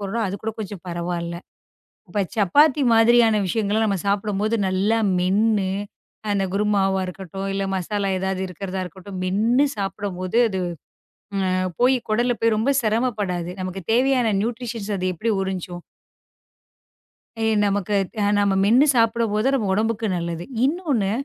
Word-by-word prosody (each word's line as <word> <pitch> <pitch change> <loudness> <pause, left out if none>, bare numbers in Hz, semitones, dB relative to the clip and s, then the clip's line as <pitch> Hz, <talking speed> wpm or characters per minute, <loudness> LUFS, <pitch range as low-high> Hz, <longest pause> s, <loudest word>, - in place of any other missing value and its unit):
போடுறோம். 210 +3 -2
அது 190 - -3
கூடக் 220 0 -4
கொஞ்சம் 200 -3 -7
பரவாயில்ல. 170 0 -3 0.7
இப்ப 205 +3 0
சப்பாத்தி 275 - +4
மாதிரியான 225 0 +5
விஷயங்கள 210 +2 0
நாம 200 -2 0
சாப்பிடும்போது 205 +2 0
நல்லா 195 +4 +1 0.2
மென்னு 200 +2 +2 0.6
அந்தக் 195 -2 0
குருமாவா 195 -2 +1
இருக்கட்டும், 190 +1 -6
இல்ல 195 - -1
மசாலா 195 +2 -1
ஏதாவது 190 0 -2
இருக்கறதா 190 +1 -5
இருக்கட்டும். 190 +2 -9
மென்னு 220 +8 +2
சாப்பிடும்போது 195 0 -3
அது 190 -1 -3 0.8
அ 190 -1 0 0.3
போய் 255 +2 +5
குடல்ல 240 +3 +2
போய் 230 -1 +3
ரொம்ப 225 +6 +1
சிரமப்படாது. 210 -6 -1
நமக்குத் 185 -1 -6
தேவையான 250 0 +3
நியூட்ரிஷ்யன் 230 -2 -3
அது 185 0 -1
எப்டி 225 +7 -1
உறிஞ்சும்? 180 -2 -4 1.7
ஏன் 220 -1 +2
நமக்கு 200 0 0 0.4
நாம 200 -1 +2
மென்னு 245 +8 +5
சாப்பிடும்போது 225 0 +2
நம்ம 235 -6 0
உடம்புக்கு 225 +1 0
நல்லது. 170 0 -4 0.2
இன்னொன்னு, 280 - 0
205 Hz, 125 wpm, -22 LUFS, 190-225 Hz, 1.7 s, மாதிரியான